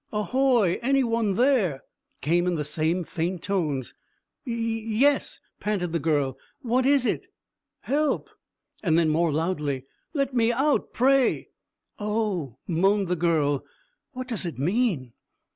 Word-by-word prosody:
"Ahoy! 225 -2 +2
Any 270 +2 +3
one 230 -4 0
there?" 225 - +2 0.4
came 175 +3 +2
in 180 - +1
the 150 - -1
same 160 +4 -1
faint 170 +2 -3
tones. 155 -10 -1 0.5
"Yes 230 -3 -3
yes," 270 +6 +2 0.2
panted 195 -5 -1
the 170 - 0
girl. 140 -4 0 0.2
"What 250 +2 +2
is 280 -2 +4
it?" - - -1 0.5
"Help!" 295 +2 0 0.5
And 165 -5 +2
then, 165 -2 +3
more 165 +1 +2
loudly, 150 -4 -1 0.3
"Let 275 -2 0
me 235 -1 +3
out, 275 +4 +1
pray." 265 +1 +2 0.5
"Oh," 205 - -2
moaned 195 +3 +2
the 180 - +2
girl, 155 -5 +1 0.5
"what 255 -1 -5
does 230 -6 -2
it 170 -3 -4
mean?" 170 - 0
195 Hz, 135 wpm, -26 LUFS, 160-240 Hz, 0.5 s, is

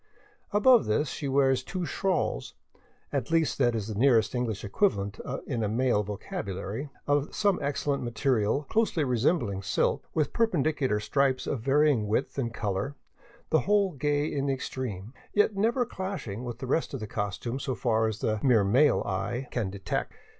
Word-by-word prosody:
Above 235 +4 +5
this 130 +7 +1
she 145 - -4
wears 135 -1 +3
two 180 +5 -4
shawls 185 +4 -1 0.3
— - - -35
at 135 -5 -1
least 165 -3 +1
that 120 -3 +3
is 110 -2 -3
the 110 - -4
nearest 115 0 +3
English 120 -5 -2
equivalent 100 - 0 0.3
in 120 -5 -2
a 105 - 0
male 120 -1 +2
vocabulary 105 +4 -5
— - - -34
of 145 0 +1
some 200 -3 +2
excellent 140 0 -1
material 120 +1 +1
closely 215 -1 +1
resembling 125 - +1
silk, - - 0
with 155 -2 +1
perpendicular 155 - +1
stripes 135 +4 +1
of 135 - -2
varying 135 -3 +3
width 115 +6 -1
and 120 -3 -1
color, 105 +4 -2 0.6
the 160 - +5
whole 200 -2 +2
gay 145 0 0
in 140 -2 -2
the 135 - +2
extreme, 120 -5 -5 0.2
yet 210 0 +3
never 235 +5 +2
clashing 185 - -5
with 120 -2 -5
the 130 - -6
rest 140 +2 0
of - - -4
the 110 - -4
costume 105 +5 -3
so 130 -2 -2
far 115 -3 +1
as 110 0 -4
the 110 -1 0
mere 120 -6 +4
male 125 +7 +4
eye 120 +7 -2
can 115 -6 -1
detect. 95 0 -3
130 Hz, 175 wpm, -28 LUFS, 110-150 Hz, 0.6 s, Above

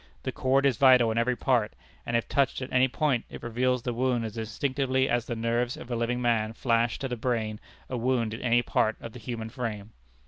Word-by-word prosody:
The - - -2
cord 135 +1 +2
is 135 -5 +3
vital 125 -3 +6
in 115 - 0
every 125 +2 +1
part, 120 -4 +1 0.3
and 120 - +2
if 115 - -2
touched 140 -1 +1
at 130 - -6
any 130 +1 +5
point 130 -2 0
it - - -10
reveals 125 +1 0
the 120 - -2
wound 120 -1 0
as 110 0 -6
instinctively 130 +4 0
as 120 -2 0
the 120 - -2
nerves 120 +2 -1
of 125 - -9
a - - 0
living 120 +1 -1
man 115 -3 +1
flash 115 -1 +1
to 135 - -3
the 125 - -3
brain 110 -3 -2 0.3
a 125 - -3
wound 120 -2 0
in 115 - -6
any 120 0 +3
part 110 -1 +1
of 115 - -8
the 125 - -9
human 115 -1 -5
frame. 110 -4 -5
120 Hz, 230 wpm, -27 LUFS, 115-130 Hz, 0.3 s, vital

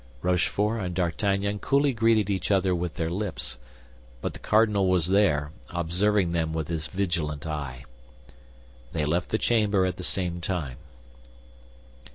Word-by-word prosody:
Rochefort 100 +5 +1
and 90 -2 -3
D'Artagnan 100 +3 0
coolly 140 +3 +2
greeted 110 -3 +3
each 95 -3 -1
other 95 -2 +3
with 85 -1 -2
their 80 0 -2
lips; 85 - -3 0.6
but - - -3
the - - -10
cardinal 105 -3 +3
was 90 -2 +2
there, 75 -7 +3 0.2
observing 90 +2 +1
them 80 -2 0
with 80 -1 -3
his 80 -2 -2
vigilant 85 -6 -2
eye. 70 -5 -5 1.1
They 75 -2 0
left 85 +4 0
the 110 - +1
chamber 105 -5 +2
at 90 -1 -2
the 90 - -6
same 90 -1 -1
time. 80 -9 -3
90 Hz, 145 wpm, -26 LUFS, 80-100 Hz, 1.1 s, greeted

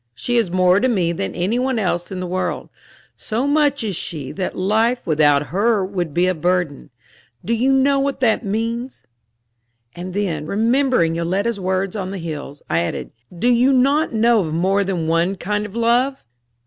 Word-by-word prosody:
She 240 - -1
is 225 -6 +2
more 185 +1 +3
to 255 - +2
me 185 -9 +1
than 95 - -4
any 190 +7 0
one 260 -1 0
else 180 -3 -1
in 185 - -4
the 185 - -3
world; 185 +1 -3 0.5
so 235 +4 -2
much 290 -2 +2
is 205 -4 -2
she 150 -5 -5
that 190 -2 -4
life 220 +6 +1
without 150 -2 +3
her 205 +1 +1
would 180 -4 -3
be 175 +4 +2
a 185 - +2
burden. 175 -3 -1 0.6
Do 230 - 0
you 250 +4 +2
not 270 0 +4
know 275 0 +3
what 275 0 -1
that 235 -1 +2
means?" 230 - -3 0.9
And 180 +1 -7
then, 165 -7 -2
remembering 230 - +2
Yoletta's 195 +7 -1
words 190 +1 -1
on 190 -3 -3
the 195 - -5
hills, 150 -4 -7
I 85 - +1
added: 85 - -3 0.3
"Do 230 - 0
you 245 +2 +4
not 275 +4 +3
know 230 +1 +3
of 160 -5 -2
more 195 +4 +2
than 185 -4 -2
one 170 +4 +1
kind 205 +3 -2
of 205 - -14
love?" 240 +4 +1
195 Hz, 185 wpm, -20 LUFS, 175-235 Hz, 0.9 s, not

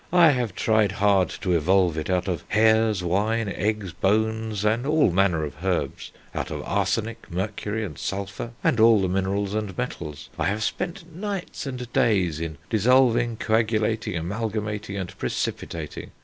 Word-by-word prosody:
I 170 -3 +7
have 120 -8 -1
tried 110 -3 +2
hard 100 -2 +3
to 90 -2 +1
evolve 90 +1 +3
it 80 +1 -3
out 90 0 +1
of 90 -3 -2
hairs, 110 -2 +3
wine, 105 +5 +1
eggs, 100 -1 -2
bones, 110 +1 0
and 110 +3 +2
all 150 - +4
manner 90 -3 +2
of 75 +3 -7
herbs; 95 -2 -2 0.2
out - - -3
of - - -5
arsenic, 115 +1 -1
mercury, 105 +4 -3
and 75 -8 -8
sulphur, 100 +4 -4
and 115 - +2
all 115 -1 +7
the 95 - +1
minerals 95 +2 -1
and 105 -3 -3
metals.... 75 - -5
I - - +1
have 105 +3 0
spent 170 - -4
nights 195 -5 -4
and 125 -2 -6
days 90 -9 +2
in 80 -2 -4
dissolving, 120 +1 +3
coagulating, 110 -3 0
amalgamating, 105 +2 -3
and 95 -1 -5
precipitating. 80 -4 -4
105 Hz, 155 wpm, -25 LUFS, 95-115 Hz, 0.2 s, I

